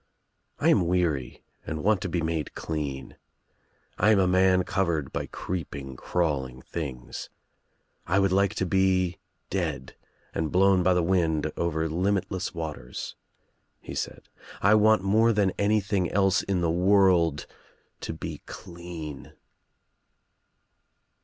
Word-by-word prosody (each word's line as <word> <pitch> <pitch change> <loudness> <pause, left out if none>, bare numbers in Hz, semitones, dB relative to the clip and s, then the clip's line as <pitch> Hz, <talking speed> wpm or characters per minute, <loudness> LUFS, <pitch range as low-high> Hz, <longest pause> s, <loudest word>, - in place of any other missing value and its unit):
"I - - +2
am 85 - +4
weary 85 -8 -1 0.2
and 80 -1 -5
want 105 -1 +3
to - - -3
be 85 - -1
made 80 -2 -2
clean. 75 -4 -4 0.8
I 105 - +4
am 110 - +5
a 95 - +4
man 95 0 +4
covered 85 -7 -1
by - - -3
creeping 70 -7 -5
crawling 65 -5 -2
things. 70 -7 -6 0.8
I 90 +3 +2
would 95 -1 +3
like 100 +1 +2
to 95 - 0
be 90 -2 +1 0.3
dead - - -3 0.4
and 80 -1 -2
blown 95 0 +4
by 90 0 +3
the 90 - +2
wind 85 -4 +1
over 80 -1 -1
limitless 95 +3 -1
waters," 75 -7 -6 0.6
he - - -9
said. - - -5 0.3
"I 100 +2 +4
want 110 -2 +5
more 110 +4 +4
than 100 -3 +2
any 105 +1 +3
thing 100 -2 0
else 95 -1 +3
in 95 -3 -1
the 85 -1 +1
world 90 -4 +3 0.5
to - - -5
be 80 - -6
clean." 85 -4 -8
90 Hz, 135 wpm, -27 LUFS, 80-95 Hz, 0.8 s, am